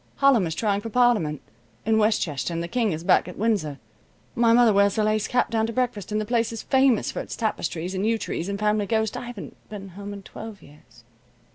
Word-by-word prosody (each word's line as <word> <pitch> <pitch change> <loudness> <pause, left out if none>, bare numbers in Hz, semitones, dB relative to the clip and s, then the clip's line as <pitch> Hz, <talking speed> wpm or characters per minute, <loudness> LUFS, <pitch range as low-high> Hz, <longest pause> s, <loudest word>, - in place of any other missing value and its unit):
"Hallem 265 -10 +4
is 160 - -4
trying 205 0 0
for 225 - -6
Parliament 220 - +2 0.4
in 220 0 +3
Westchester 185 -9 0
and 170 0 -2
the - - -4
King 230 +1 0
is 160 0 -4
back - - +3
at 180 - -9
Windsor. 200 -10 0 0.6
My 230 -1 +3
mother 235 -2 +5
wears 200 +1 +3
a 215 - +2
lace 215 0 +1
cap 245 - +1
down 225 -1 +1
to 230 - -5
breakfast, 240 -5 -2
and 210 - 0
the 215 - -2
place 230 0 0
is 225 - -6
famous 265 -4 +3
for - - -5
its - - -6
tapestries 180 -5 -2
and 190 +1 -2
yew 225 +1 +2
trees 185 -4 -4
and 200 - -2
family 210 0 +1
ghost. 220 -1 0
I 245 - -5
haven't 240 -5 -8
been 195 -2 -8
home 200 +3 -8
in 200 -1 -8
twelve 220 -1 -10
years." 125 -5 -19
210 Hz, 230 wpm, -24 LUFS, 190-230 Hz, 0.6 s, mother